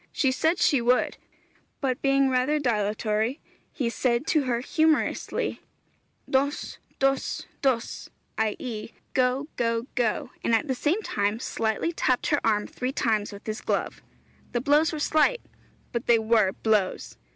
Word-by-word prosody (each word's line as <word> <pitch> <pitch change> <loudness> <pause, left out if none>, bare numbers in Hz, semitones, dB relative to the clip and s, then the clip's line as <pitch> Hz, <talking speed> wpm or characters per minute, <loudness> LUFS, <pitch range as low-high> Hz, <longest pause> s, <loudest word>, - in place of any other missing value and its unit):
She 270 -3 +2
said 320 +6 +1
she 275 -5 +3
would, 245 +2 +2 0.6
but 265 -2 -1
being 275 0 +3
rather 260 +3 +2
dilatory, 220 0 0 0.3
he 265 -7 -2
said 235 +2 0
to 305 -4 +2
her 240 -2 0
humorously 315 +3 0 0.7
'Dôs, 280 +2 -1 0.2
dôs, 270 0 0 0.2
dôs,' 255 -4 -1 0.3
i.e., 220 +1 -3 0.2
'Go, 255 +2 +1
go, 230 0 0
go,' 235 -4 0
and 230 - +3
at 225 - 0
the 265 - +1
same 320 - 0
time 205 - -1
slightly 225 +6 -1
tapped 255 -6 0
her 290 - +2
arm 210 -2 +2
three 255 +1 -3
times 215 -5 0
with 200 +1 -11
his 215 -1 -4
glove.... - - -2 0.5
The 240 - +1
blows 295 +4 +3
were 315 - -4
slight 310 +11 +2 0.5
but 235 +1 -3
they 235 - +6
were 220 -3 +3
blows. 210 -2 0
250 Hz, 145 wpm, -26 LUFS, 225-280 Hz, 0.7 s, they